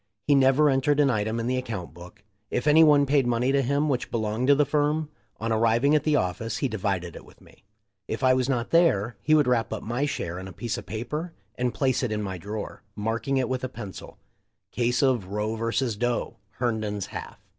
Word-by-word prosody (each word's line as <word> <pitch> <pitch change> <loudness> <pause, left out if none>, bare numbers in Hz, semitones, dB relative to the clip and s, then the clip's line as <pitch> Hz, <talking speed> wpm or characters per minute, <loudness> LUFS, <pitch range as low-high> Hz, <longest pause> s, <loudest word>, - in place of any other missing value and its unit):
He 145 - +4
never 135 +2 +5
entered 135 +2 +2
an 140 -2 +4
item 110 +1 -1
in 115 - -2
the 130 +1 0
account 115 -10 -6
book. 90 +4 -13 0.3
If 125 - -2
any 155 +2 +7
one 145 -2 +5
paid 140 -2 +2
money 120 +2 +1
to 140 0 +3
him 140 +4 +1
which 130 -4 -1
belonged 110 +2 -1
to 140 - +6
the 145 +1 +3
firm, 150 +1 0 0.3
on 115 +1 -2
arriving 115 +5 +3
at 150 -1 +2
the 155 -1 +3
office 105 +2 -1
he 135 - 0
divided 95 -6 -3
it - - -10
with - - -19
me. - - -21 0.4
If - - -4
I 130 0 +5
was 130 0 0
not 120 -3 -1
there, 120 - +3
he 155 - +3
would 150 -2 +4
wrap 125 -2 +1
up 110 - -4
my 120 +6 -1
share 90 -10 -4
in 95 - -7
a 95 - -10
piece 120 -1 -3
of - - -8
paper 150 +10 -4 0.2
and 125 +2 -1
place 130 -1 0
it 125 -4 -1
in 105 0 -2
my 95 -2 -5
drawer 105 +3 -6
— - - -44
marking 115 +6 -1
it 130 -2 +1
with 130 0 -3
a 130 - -2
pencil, 105 -6 -9 0.5
"Case 125 +2 +1
of 125 -8 +2
Roe 105 +2 -2
vs. 115 +1 -1
Doe. 120 +1 -2
— - - -43
Herndon's 110 -5 -2
half." - - -8
120 Hz, 230 wpm, -26 LUFS, 110-140 Hz, 0.5 s, any